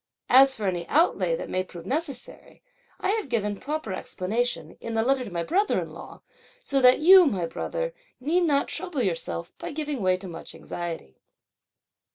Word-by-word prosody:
As 270 Hz, +1 st, +7 dB
for 215 Hz, -, -4 dB
any 175 Hz, -2 st, -2 dB
outlay 195 Hz, -, +2 dB
that -, -, -6 dB
may 185 Hz, -, -1 dB
prove 175 Hz, -2 st, -11 dB
necessary, 275 Hz, -, -5 dB, 0.4 s
I -, -, -1 dB
have 420 Hz, -7 st, -1 dB
given 210 Hz, -4 st, -1 dB
proper 295 Hz, -8 st, -4 dB
explanation, 185 Hz, -4 st, -2 dB
in 230 Hz, -1 st, -5 dB
the 225 Hz, -, +2 dB
letter 265 Hz, +1 st, +2 dB
to 235 Hz, -, -7 dB
my 170 Hz, -1 st, -2 dB
brother 395 Hz, -, +1 dB
in -, -, -6 dB
law, -, -, -11 dB, 0.4 s
so 275 Hz, -1 st, 0 dB
that 250 Hz, 0 st, +7 dB
you, 360 Hz, +2 st, +8 dB
my 190 Hz, -9 st, -1 dB
brother, -, -, -4 dB, 0.3 s
need 335 Hz, +7 st, +1 dB
not 285 Hz, -3 st, +2 dB
trouble 300 Hz, -9 st, -3 dB
yourself 165 Hz, -, -3 dB
by -, -, -5 dB
giving 295 Hz, -4 st, -3 dB
way 185 Hz, -1 st, +2 dB
to 190 Hz, +1 st, -9 dB
much 165 Hz, -2 st, -9 dB
anxiety." 165 Hz, -, -7 dB
245 Hz, 180 wpm, -26 LUFS, 185-300 Hz, 0.4 s, you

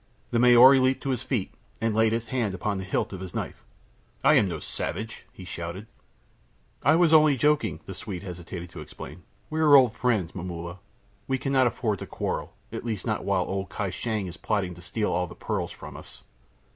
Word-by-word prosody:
The 115 Hz, -, +2 dB
Maori 125 Hz, +2 st, +8 dB
leaped 130 Hz, +1 st, +2 dB
to 135 Hz, -, 0 dB
his 125 Hz, -3 st, -1 dB
feet 130 Hz, -7 st, -2 dB, 0.3 s
and 115 Hz, -1 st, 0 dB
laid 110 Hz, 0 st, +3 dB
his 115 Hz, 0 st, -2 dB
hand 115 Hz, -7 st, -1 dB
upon 100 Hz, +2 st, -2 dB
the -, -, -4 dB
hilt 95 Hz, +1 st, -1 dB
of 95 Hz, -, -6 dB
his 95 Hz, -1 st, -8 dB
knife. -, -, -4 dB, 0.6 s
"I -, -, +6 dB
am 100 Hz, -, +5 dB
no 85 Hz, -3 st, -3 dB
savage," 110 Hz, +8 st, -5 dB
he 95 Hz, -, -11 dB
shouted. 85 Hz, +4 st, -6 dB, 1.0 s
"I 155 Hz, -, +5 dB
was 165 Hz, -1 st, +4 dB
only 155 Hz, -3 st, +6 dB
joking," 150 Hz, +3 st, +1 dB
the 95 Hz, -, -6 dB
Swede 95 Hz, -1 st, -6 dB
hastened 90 Hz, -1 st, -7 dB
to 85 Hz, -, -8 dB
explain. 75 Hz, +2 st, -10 dB, 0.3 s
"We 155 Hz, -, -1 dB
are 150 Hz, -2 st, +7 dB
old 125 Hz, -5 st, +6 dB
friends, 110 Hz, -11 st, 0 dB
Momulla; 85 Hz, 0 st, -6 dB, 0.5 s
we 135 Hz, -, +1 dB
cannot 130 Hz, -1 st, +2 dB
afford 110 Hz, -4 st, -1 dB
to -, -, -7 dB
quarrel, -, -, -3 dB, 0.2 s
at -, -, -5 dB
least 110 Hz, -5 st, -3 dB
not -, -, -1 dB
while -, -, +2 dB
old 95 Hz, -2 st, -3 dB
Kai 100 Hz, +2 st, -3 dB
Shang 110 Hz, +1 st, -2 dB
is 85 Hz, -1 st, -7 dB
plotting 100 Hz, -5 st, -1 dB
to 90 Hz, -, -13 dB
steal 105 Hz, +5 st, -2 dB
all 90 Hz, 0 st, 0 dB
the -, -, -11 dB
pearls -, -, -2 dB
from -, -, -10 dB
us. -, -, -12 dB
105 Hz, 205 wpm, -27 LUFS, 90-130 Hz, 1.0 s, Maori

